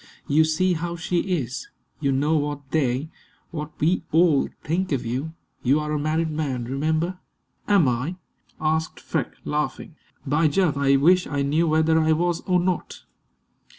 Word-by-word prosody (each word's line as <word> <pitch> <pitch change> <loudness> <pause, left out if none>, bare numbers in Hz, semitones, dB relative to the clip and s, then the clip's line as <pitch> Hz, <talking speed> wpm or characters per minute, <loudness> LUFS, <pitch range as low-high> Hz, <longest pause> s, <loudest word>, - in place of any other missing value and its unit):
You 155 +2 +4
see 180 +4 +2
how 170 +1 -3
she 175 +1 -1
is. 150 -9 -2 0.3
You 140 -3 +1
know 145 +4 +2
what 145 -2 -3
they 140 0 0 0.4
what 150 -3 -4
we 170 +5 +2
all 160 -3 +4
think 180 +3 -1
of 135 -5 -1
you. 135 +7 -3 0.3
You 135 +4 +3
are 150 0 -3
a 150 - 0
married 155 +2 0
man, 140 -6 -2
remember." 155 +7 -1 0.5
"Am 200 -8 +4
I?" 125 +8 -1 0.4
asked 160 +1 -1
Freke, - - -3
laughing. 150 +1 -3 0.3
"By 150 +3 +3
Jove, 155 -1 +2
I 140 -1 +3
wish 180 +6 +4
I 140 -1 -1
knew 155 +4 +2
whether 160 +1 +3
I 160 0 +3
was 175 +1 0
or 180 -1 +3
not!" 180 -1 -2
155 Hz, 160 wpm, -24 LUFS, 140-170 Hz, 0.5 s, You